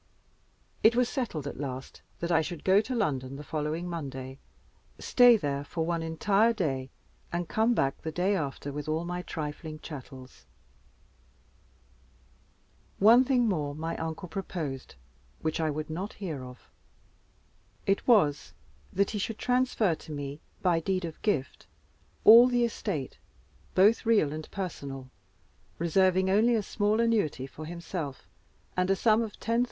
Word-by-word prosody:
It 225 +2 +5
was 250 0 +3
settled 220 - -3
at 145 - -6
last 135 -2 -6 0.2
that 170 +1 -1
I 165 - +4
should 165 0 -6
go 190 +2 +5
to 255 +4 -4
London 135 - -1
the 145 - -8
following 155 +3 -3
Monday, 135 -5 -6 0.6
stay 245 -2 +6
there 140 -6 -2
one 165 0 0
entire 200 +8 +2
day, 135 -10 -2 0.4
and 175 0 -2
come 225 +5 +2
back 135 -7 0
the 160 - -4
day 185 +5 +1
after 145 -3 -3
with 145 +1 -5
all 160 +2 -1
my 180 +1 -3
trifling 155 -1 -6
chattels. 130 -4 -11 2.5
One 230 +5 +7
thing 250 -3 +2
more 150 -8 -1
my 160 +2 -3
uncle 160 +3 -5
proposed 160 - -5 0.5
which 155 0 -1
I 160 -1 +1
would 155 +1 -3
not 185 +6 -4
hear 160 -10 -5
of. 125 0 -12 1.2
It 195 0 0
was, 155 - +3 0.4
that 200 0 +1
he 210 - -3
should 220 +2 -3
transfer 250 -6 +1
to 160 - -10
me, 145 0 -5 0.2
by 175 -3 +3
deed 185 +1 -1
of 160 -2 -8
gift, 155 -12 -2 0.6
all 230 +3 +10
the 245 -1 +2
estate, 190 - -4 0.6
both 210 +5 +4
real 205 -11 +3
and 155 0 -7
personal, 140 -8 -6 0.7
reserving 185 +2 +2
only 220 +5 +4
a 215 - 0
small 210 +2 0
annuity 215 - +1
for 155 +3 -9
himself, 170 -4 -6 0.5
and 180 0 +1
a 195 - +4
sum 220 +3 +3
of 220 -2 -4
10,000*l. 230 +1 -1
170 Hz, 145 wpm, -29 LUFS, 150-210 Hz, 2.5 s, all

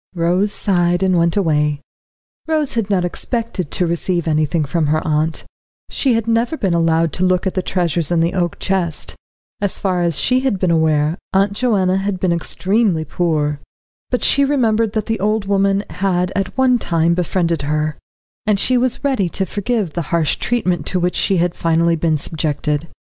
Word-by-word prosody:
Rose 180 +4 +1
sighed, 175 -3 +1
and 185 -1 +2
went 170 +2 +2
away. 150 -5 +1 0.7
Rose 310 -3 +1
had 225 -3 -1
not 185 -3 +1
expected 220 - -3
to 180 - 0
receive 170 0 -1
anything 155 0 +1
from 155 +2 0
her 155 +2 +2
aunt. 155 +1 0 0.5
She 260 -4 +1
had 225 -1 -1
never 230 +6 +1
been 190 - 0
allowed 165 -1 +2
to 180 - -2
look 185 0 +2
at 190 - -1
the 185 - 0
treasures 170 -4 0
in 175 - +1
the 165 +1 +1
oak 175 -3 -1
chest. 180 -5 -2 0.5
As 200 -2 0
far 185 -3 0
as 170 -3 0
she 255 0 +2
had 260 -6 0
been 185 -2 +1
aware, 160 0 +1
Aunt 195 +1 +2
Joanna 200 -5 +1
had 195 -1 -2
been 185 -1 +1
extremely 185 0 0
poor. 150 -5 -1 0.5
But 250 - -1
she 280 - +4
remembered 230 -6 +1
that 215 -2 -1
the 225 -2 -2
old 210 +1 0
woman 195 0 +1
had 180 -1 0
at 195 +3 -2
one 255 -2 +3
time 170 -3 +1
befriended 170 -2 0
her, 150 +1 -1 0.5
and 210 -2 +2
she 255 +3 +2
was 255 +2 -1
ready 260 -11 +1
to 190 - -2
forgive 205 -2 -2
the 170 - -2
harsh 165 -3 +1
treatment 180 -10 -1
to 185 - 0
which 180 0 0
she 195 - +1
had 175 0 +1
finally 165 0 +1
been 160 -1 +1
subjected. 150 0 -2
180 Hz, 185 wpm, -18 LUFS, 165-205 Hz, 0.7 s, she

